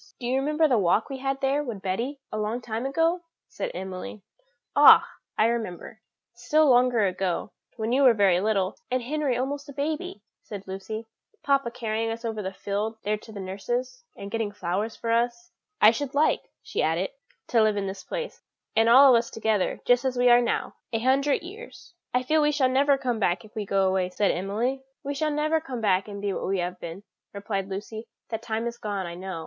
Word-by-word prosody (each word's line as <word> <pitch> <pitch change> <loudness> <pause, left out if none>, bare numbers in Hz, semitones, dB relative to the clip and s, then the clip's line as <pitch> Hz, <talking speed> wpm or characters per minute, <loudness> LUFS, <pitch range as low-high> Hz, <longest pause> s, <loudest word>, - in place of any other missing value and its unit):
"Do 245 - -6
you 255 +2 +1
remember 305 +3 +2
the 250 -6 +3
walk 200 +7 +2
we 270 - -5
had 270 0 -2
there 275 +2 +1
with 225 -8 -6
Betty 235 +9 -2
a 215 - -3
long 215 +3 -1
time 235 +1 -3
ago?" 330 +5 +1 0.3
said - - -4
Emily. 190 +2 -6 0.5
"Ah! - - +8 0.3
I - - +4
can 230 - +4
remember, 220 -1 -5 0.3
still 295 +6 +2
longer 245 -4 +4
ago, 185 +1 -2 0.2
when 220 +1 -2
you 265 +3 +3
were 255 -4 +6
very 190 -4 +4
little, 200 -3 0
and 255 -1 0
Henry 285 -1 -1
almost 280 +3 -3
a - - -8
baby," 285 -7 -3 0.2
said 200 -2 -8
Lucy, 205 +4 -6 0.4
"papa 275 -3 +2
carrying 225 -1 -2
us 230 +1 -5
over 220 -2 -3
the 190 -1 -4
field 205 +3 -3
there 210 +1 +1
to 220 - -13
nurse's, 240 +6 -4
and 200 0 -8
getting 225 -2 -1
flowers 205 +3 -3
for 230 - -3
us." 240 +10 0 0.3
"I 215 - +8
should 275 +3 -4
like," 300 +2 +3 0.2
she - - -2
added, - - 0 0.4
"to 230 - +4
live 215 -1 +3
in 200 - -1
this 190 0 -6
place, - - -5 0.3
and 225 +1 +4
all 265 +2 +8
of 235 - +6
us 230 - -5
together, 220 -3 -1
just 245 +1 +4
as 260 -1 -1
we 245 0 +4
are 240 0 +7
now, 240 - -2
a 225 - 0
hundred 270 +6 +2
years." 410 +2 -11 0.2
"I 250 0 +1
feel 310 +4 +2
we 295 0 +3
shall 280 -3 +2
never 275 +2 +3
come 250 -4 -2
back 175 -2 0
if 215 - -17
we 210 -2 -4
go 195 -1 +2
away," 185 -1 +1
said 200 +2 +1
Emily. 220 +9 -2 0.2
"We 285 - -3
shall 305 +2 0
never 305 +2 +1
come 265 -6 -6
back 195 -3 +2
and 200 -1 -7
be 200 -1 0
what - - -3
we 195 +1 0
have 180 0 -3
been," 170 +4 -7 0.3
replied 200 -1 -3
Lucy; 215 +3 -6 0.2
"that 225 -1 -3
time 225 0 -3
is 235 0 -4
gone, 200 -3 -3
I 170 - -6
know. 185 -1 -6
230 Hz, 210 wpm, -26 LUFS, 200-270 Hz, 0.5 s, Ah